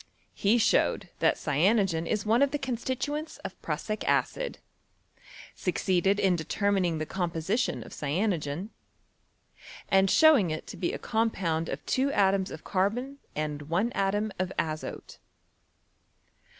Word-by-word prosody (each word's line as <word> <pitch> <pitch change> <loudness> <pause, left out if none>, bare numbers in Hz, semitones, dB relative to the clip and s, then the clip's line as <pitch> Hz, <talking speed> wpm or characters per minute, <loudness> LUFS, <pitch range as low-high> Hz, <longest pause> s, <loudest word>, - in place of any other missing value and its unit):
He 210 +4 +3
showed 230 0 +2
that - - +3
cyanogen 170 +2 +2
is 210 -1 -1
one 225 +4 +3
of 280 - +5
the 290 - -1
constituents 270 +4 -3
of - - -7
prussic 215 0 -3
acid; - - 0 1.0
succeeded 190 +2 +1
in 190 -2 +3
determining 185 0 0
the 155 - -2
composition 175 +6 -1
of - - -12
cyanogen, 170 +2 -2 1.2
and 195 0 +4
showing 295 - +6
it 155 0 -4
to - - -8
be 175 - -1
a - - -4
compound 185 -8 -1
of - - -5
two 270 +2 +1
atoms 195 -3 +2
of 155 - -9
carbon 245 +9 -1 0.2
and 150 -1 -4
one 190 +8 +1
atom 205 +2 0
of 185 0 -1
azote. 155 -1 -4
195 Hz, 130 wpm, -28 LUFS, 165-230 Hz, 1.2 s, showing